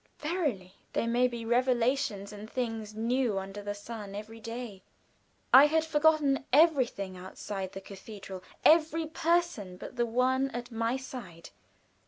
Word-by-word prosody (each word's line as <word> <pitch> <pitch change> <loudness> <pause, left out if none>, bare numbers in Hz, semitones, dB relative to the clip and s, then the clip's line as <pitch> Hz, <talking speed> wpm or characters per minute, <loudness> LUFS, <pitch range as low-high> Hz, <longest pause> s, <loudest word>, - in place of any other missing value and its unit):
Verily, 290 - -2 0.2
there - - 0
may 240 +2 +3
be 235 -2 -6
revelations 240 -3 +1
and 210 +1 -9
things 225 -4 -3
new 235 -1 +1
under 195 +1 -5
the 205 0 -4
sun 205 -1 -8
every 220 +2 -8
day. 230 -3 -7 0.7
I 275 +3 +10
had 320 +1 +2
forgotten 300 -3 +3
everything 260 - +3
outside 190 +1 -6
the 195 - -7
cathedral 195 -1 -9 0.2
every 320 0 +5
person 320 - 0
but 250 - -9
the 240 0 +1
one 260 +3 +2
at 245 +1 -5
my 230 +2 0
side. 250 -11 -9
235 Hz, 140 wpm, -30 LUFS, 205-270 Hz, 0.7 s, I